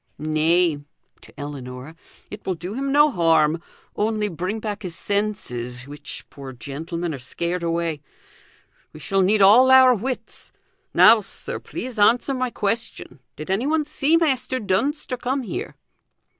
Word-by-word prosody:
"Nay" 155 +1 +2 0.4
to - - -15
Ellinor 135 0 -7 0.4
"it 210 - -9
will 185 - -2
do 180 +4 -6
him 275 +3 -2
no 295 +1 +5
harm; 165 - +2 0.3
only 215 0 0
bring 185 +5 -3
back 210 -1 -5
his 180 -4 -5
senses, 130 - -3
which, 145 +1 -7
poor 135 -2 -9
gentleman, 160 +7 -5
are 140 - -6
scared 170 +8 -3
away. 165 -2 -2 0.9
We 155 - -11
shall 195 +5 0
need 200 +2 +3
all 235 +7 +7
our 260 -1 +8
wits. 250 +3 -5 0.4
Now, 220 0 +7
sir, 195 - -7
please 245 -3 -7
answer 240 +6 +3
my 255 -1 -1
question. 225 - -3 0.2
Did 155 +5 -6
anyone 290 +10 +1
see 300 +2 +2
Measter 260 -5 0
Dunster 250 +7 -1
come 260 +2 -2
here?" 195 - -5
195 Hz, 145 wpm, -22 LUFS, 160-245 Hz, 0.9 s, our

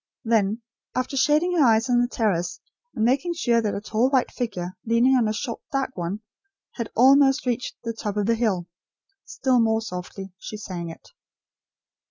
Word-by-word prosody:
Then, 225 -1 +1 0.3
after 255 +2 -2
shading 305 +6 +2
her - - +6
eyes 225 -1 +4
on 245 -1 +3
the 245 - +1
terrace, 200 -8 -1 0.4
and 220 - +1
making 275 +8 +1
sure 235 -7 +2
that 210 -2 -1
a - - -2
tall 225 +4 +1
white 265 -3 +1
figure 185 -7 -4
leaning 235 +3 +3
on 240 -4 +3
a - - 0
short 230 +2 -4
dark 270 -2 -2
one, 180 +4 -4 0.5
had 235 -3 -5
almost 270 +3 +5
reached 250 0 -2
the 230 0 -3
top 210 -2 -4
of 205 - +1
the 230 - +3
hill, 215 -7 0 0.6
still 260 -2 +1
more 220 -1 +3
softly, 190 -2 -7
she 215 - -7
sang 180 -5 -6
it. 165 - -12
230 Hz, 180 wpm, -24 LUFS, 210-255 Hz, 0.6 s, her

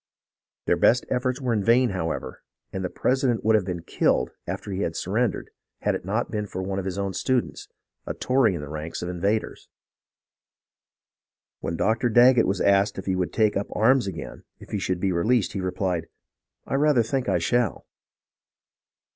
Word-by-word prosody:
Their 85 - +2
best 120 +7 +4
efforts 125 +1 0
were 125 -3 -1
in 105 -3 0
vain, 120 +2 +4
however, 80 -4 -4 0.3
and 95 - -3
the 90 - -2
president 125 -1 0
would 110 - +4
have 105 -4 +2
been 90 -3 -4
killed - - +1 0.2
after 100 - -5
he 95 +1 -2
had 85 -4 -2
surrendered 110 +7 -1 0.3
had - - +1
it - - -4
not 105 +6 -2
been 105 -1 -2
for 95 -1 -5
one 95 +1 -2
of 95 - -5
his 95 -1 -3
own 100 -1 -2
students, 130 +3 -1 0.4
a - - -3
Tory 125 -7 +2
in 80 - -5
the 75 - -7
ranks 80 +3 -5
of 90 - -3
the - - -3
invaders. 100 +5 -2 1.9
When 80 +1 -3
Dr. 115 +5 +1
Daggett 120 +1 +6
was 95 -1 -1
asked 100 +1 +3
if - - -6
he 95 - 0
would 90 -1 -1
take 110 -2 +2
up 100 - -1
arms 125 +1 +3
again 95 - -7 0.2
if - - -14
he 105 - -1
should 90 -2 -1
be 95 0 0
released, 105 +5 +1
he 95 - -3
replied, 90 -2 -2 0.3
" - - -57
I - - -5
rather 140 -3 +3
think 130 +3 -2
I - - +3
shall." 120 -4 0
100 Hz, 190 wpm, -25 LUFS, 95-120 Hz, 1.9 s, Daggett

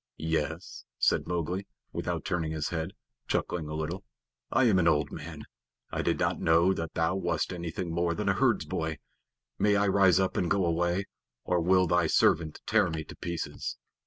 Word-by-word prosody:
"Yes," 80 +2 -3
said - - +2
Mowgli, 90 +3 -2 0.3
without - - -3
turning 80 -4 -1
his 80 -1 -2
head, 80 +2 -3 0.3
chuckling 80 -4 -1
a 75 - -4
little. 80 +5 -3 0.5
"I 130 - +4
am 105 -6 +4
an 85 - +3
old 75 -2 +2
man. 80 -1 -7 0.5
I - - -1
did - - +1
not - - 0
know 85 +3 +4
that 80 -3 -5
thou 80 +2 +2
wast 90 -1 -1
anything 85 0 -4
more 85 0 +1
than - - -3
a - - +4
herdsboy. 80 -1 0 0.6
May 105 -1 +4
I 100 +1 +3
rise 95 -2 +5
up 95 -1 0
and 90 - +1
go 95 -2 +2
away, 85 +3 +1 0.4
or 90 -1 +1
will 95 +2 +4
thy 85 0 +2
servant 80 0 +2
tear - - +3
me 80 -1 -3
to - - -11
pieces?" 85 -1 -4
85 Hz, 180 wpm, -29 LUFS, 80-95 Hz, 0.6 s, rise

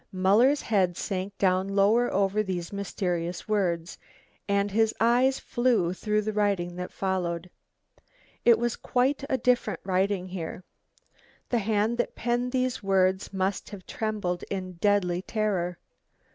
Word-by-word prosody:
Muller's 210 +10 +3
head 185 -5 +1
sank 195 0 -4
down 185 0 +2
lower 205 +5 +3
over 200 +2 +1
these 185 -3 -4
mysterious 180 -3 -3
words, 180 -5 -1 0.5
and 200 0 +1
his 220 +2 +2
eyes 245 +4 +3
flew 235 -8 +1
through 210 +2 -1
the 215 +1 -2
writing 200 -4 0
that 180 0 -5
followed. 180 -2 -2 0.9
It 235 -2 +6
was 240 +1 -1
quite 260 +3 0
a 260 - +2
different 250 0 +1
writing 185 0 0
here. 180 0 -6 0.9
The 240 - +2
hand 220 +2 0
that 240 - -1
penned 245 +1 -1
these 255 -1 0
words 190 -1 +1
must 190 0 -2
have 200 -3 -10
trembled 205 -5 -2
in 185 -2 -4
deadly 180 -2 +2
terror. 190 -4 -1
200 Hz, 135 wpm, -27 LUFS, 185-220 Hz, 0.9 s, It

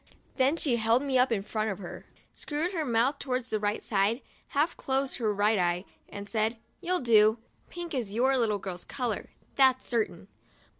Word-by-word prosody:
Then 270 +4 +3
she 265 -7 +1
held 230 +3 +3
me 265 -2 +2
up 250 0 +4
in 200 -4 0
front 215 +1 -2
of 195 - -3
her, 180 -3 -9 0.3
screwed 310 +4 -2
her 325 -4 -1
mouth 250 +2 +1
towards 255 -2 -2
the 215 - +1
right 210 +1 -1
side, 210 +4 +1 0.3
half 300 +4 +1
closed 270 0 -1
her 225 -5 0
right 205 +1 +2
eye, 175 +1 0 0.2
and 200 0 -7
said: 220 +1 0 0.2
"You'll 365 +1 0
do. 220 -2 +5 0.3
Pink 345 -1 -6
is 240 -7 -2
your 255 +5 +2
little 225 -5 +2
girl's 185 -3 -6
color, 240 -5 -3 0.3
that's 260 -2 +4
certain." 195 -7 -2
235 Hz, 185 wpm, -29 LUFS, 210-265 Hz, 0.3 s, do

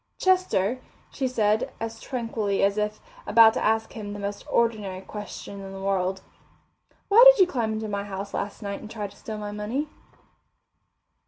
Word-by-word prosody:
"Chester," 310 - +2 0.3
she 265 - -1
said, 215 -3 +1
as 225 0 -5
tranquilly 225 -5 -2
as 200 +1 +2
if 210 0 -2 0.3
about 225 -1 +7
to - - -2
ask 220 0 +1
him 205 -2 -6
the 205 - -7
most 200 0 -4
ordinary 210 -5 0
question 200 0 -8
in 195 0 -8
the 195 - -7
world, 190 -1 -1 0.9
"why 440 +4 +7
did - - +8
you 375 - +8
climb 235 -10 -2
into 220 0 -3
my 200 -1 -3
house 200 0 -6
last 205 +2 -4
night 200 0 -4
and 215 - -9
try 215 -2 -5
to 200 - -9
steal 215 -1 -7
my 210 -1 -5
money?" 225 +9 -3
210 Hz, 175 wpm, -25 LUFS, 200-230 Hz, 0.9 s, did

